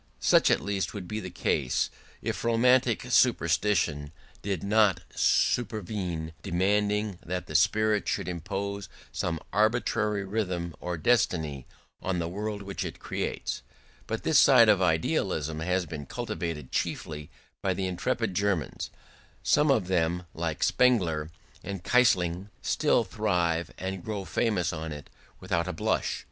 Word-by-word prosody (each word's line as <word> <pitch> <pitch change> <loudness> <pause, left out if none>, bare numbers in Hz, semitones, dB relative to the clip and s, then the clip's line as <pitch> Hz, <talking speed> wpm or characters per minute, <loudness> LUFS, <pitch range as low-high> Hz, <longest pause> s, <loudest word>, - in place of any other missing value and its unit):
Such - - +5
at - - +3
least 100 -1 -2
would 95 -3 -6
be 105 +4 -3
the 95 - -6
case 65 -7 0 0.3
if - - -3
romantic 120 0 +3
superstition 85 - +2 0.3
did 95 -5 -2
not 105 -1 +3
supervene, 95 -8 0
demanding 105 +2 0
that 90 +1 -3
the 75 - -9
spirit 105 +6 +3
should 95 -3 -1
impose 95 +3 -4 0.2
some 85 -3 -2
arbitrary 110 -2 +1
rhythm 90 -5 -2
or 90 -1 -3
destiny 80 - +1 0.3
on 95 -1 -1
the 85 -1 -1
world 105 +3 -4
which 100 0 -4
it - - -6
creates: - - -3 0.5
but - - -3
this - - +5
side - - +7
of - - +5
idealism 75 +1 0
has 90 +2 0
been 75 -4 -7
cultivated 80 -6 -4
chiefly 75 -1 -3 0.3
by 95 -2 0
the 95 - -2
intrepid 90 0 -1
Germans: 100 -3 -1 0.5
some 150 0 +3
of 115 -9 +3
them, 90 -1 +1
like 80 -1 -2
Spengler 85 -12 +2 0.3
and 95 -1 -5
Keyserling, 95 -7 +2
still 150 -6 +2
thrive 90 -6 0
and 95 -1 -4
grow 105 -3 -4
famous 95 -8 0
on 80 0 -5
it 75 -2 -9 0.3
without 90 -2 -1
a 90 - -2
blush. 80 - -1
95 Hz, 135 wpm, -28 LUFS, 85-105 Hz, 0.5 s, side